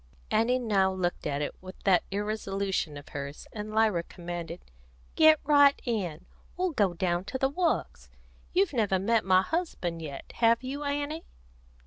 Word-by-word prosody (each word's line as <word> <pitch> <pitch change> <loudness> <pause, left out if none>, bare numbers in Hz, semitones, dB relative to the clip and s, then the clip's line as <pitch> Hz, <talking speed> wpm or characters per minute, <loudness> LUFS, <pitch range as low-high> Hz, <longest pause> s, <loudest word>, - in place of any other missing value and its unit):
Annie 240 +3 +3
now 200 -6 +2
looked 180 -3 -2
at 145 0 -1
it - - -3
with 185 0 -9
that 185 -3 +4
irresolution 195 -5 -2
of 145 - -11
hers, 140 0 -6
and 210 0 -5
Lyra 215 -5 +3
commanded: 170 -1 -7 0.5
"Get 315 -1 +7
right 285 -1 +5
in. 185 - -2 0.3
We'll 365 0 0
go 200 - +1
down 175 0 0
to 260 - -3
the 270 +1 +1
Works. 335 +3 -1 0.4
You've 370 -2 +2
never 210 -6 +2
met 220 +4 +2
my 185 0 +4
husband 190 - -2
yet; 140 -4 -7
have 230 +1 +4
you, 275 +3 -4
Annie?" 290 +3 -3
205 Hz, 155 wpm, -28 LUFS, 175-270 Hz, 0.5 s, Get